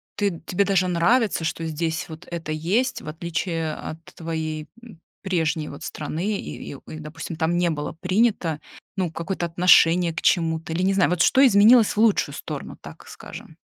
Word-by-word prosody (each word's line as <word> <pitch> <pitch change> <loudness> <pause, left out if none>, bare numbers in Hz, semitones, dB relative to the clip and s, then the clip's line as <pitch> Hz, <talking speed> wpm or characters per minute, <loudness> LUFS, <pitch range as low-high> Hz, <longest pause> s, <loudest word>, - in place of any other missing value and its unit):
ты 200 -5 -1
тебе 200 +2 +1
даже 190 -2 +2
нравится, 180 +2 +2
что 165 0 -3
здесь 160 +1 -2
вот 160 +1 -11
это 165 -2 -5
есть, 185 +12 0
в - - -12
отличие 165 0 -3
от 155 - -7 0.2
твоей, 160 -2 -4 0.2
м, 215 -9 -13 0.2
прежней 165 -5 -1
вот 140 - -9
страны, 175 +7 -3
и - - -7
и, - - -9
э, 155 - -8
допустим, 155 +2 -7
там 170 +1 0
не 175 -1 +2
было 150 -1 -4
принято, 185 -5 +1 0.4
ну, 180 -4 -1
какое-то 170 +1 -3
отношение 170 0 +4
к 160 - -4
чему-то, 160 -1 +1
или, 180 +3 -1
не 195 +1 +2
знаю, 190 -2 +3
вот 175 -1 0
что 270 - +5
изменилось 220 +1 +6
в - - -14
лучшую 220 -2 +2
сторону, - - -7
так - - -12
скажем? - - -11
170 Hz, 180 wpm, -23 LUFS, 160-195 Hz, 0.4 s, изменилось